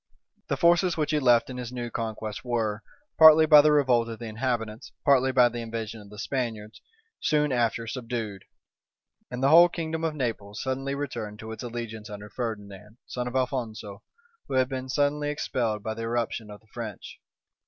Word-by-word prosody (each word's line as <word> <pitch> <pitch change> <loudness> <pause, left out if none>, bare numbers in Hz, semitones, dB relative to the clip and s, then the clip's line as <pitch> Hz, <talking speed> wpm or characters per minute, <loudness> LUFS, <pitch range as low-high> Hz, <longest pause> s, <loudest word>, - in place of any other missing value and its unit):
The - - -1
forces 175 +1 +3
which 155 -1 0
he 150 - +2
left 120 -4 +4
in 130 - -7
his 125 -1 -5
new 120 -2 -5
conquest 110 -1 -4
were, 110 -4 -1 0.4
partly 160 0 +9
by 150 -1 +9
the 150 +1 +4
revolt 125 -6 +3
of 115 - -6
the 120 - -8
inhabitants, 115 -1 -3
partly 130 -2 +4
by 125 -1 +5
the 120 0 -5
invasion 115 -1 -5
of 100 - -14
the 105 - -12
Spaniards, 110 -3 -4 0.4
soon 150 -1 +1
after 115 -2 0
subdued; 115 -5 -5 0.8
and 125 +1 -5
the 135 - +5
whole 170 +3 +8
kingdom 160 -1 -4
of 160 -2 -1
Naples 110 -6 -3
suddenly 135 +1 -2
returned 115 -7 -5
to 110 +1 -8
its 110 - -7
allegiance 115 -2 -6
under 105 0 -9
Ferdinand, 105 -2 -6
son 125 0 -4
to 130 - -1
Alphonso, 115 -6 -3 0.5
who 135 - -3
had 130 -1 +3
been 130 -1 -5
suddenly 145 +2 +1
expelled 115 -7 -2
by 110 - -2
the 115 - -7
irruption 115 -1 -2
of 105 0 -11
the 110 - -28
French. 110 -5 -7
120 Hz, 185 wpm, -27 LUFS, 110-135 Hz, 0.8 s, partly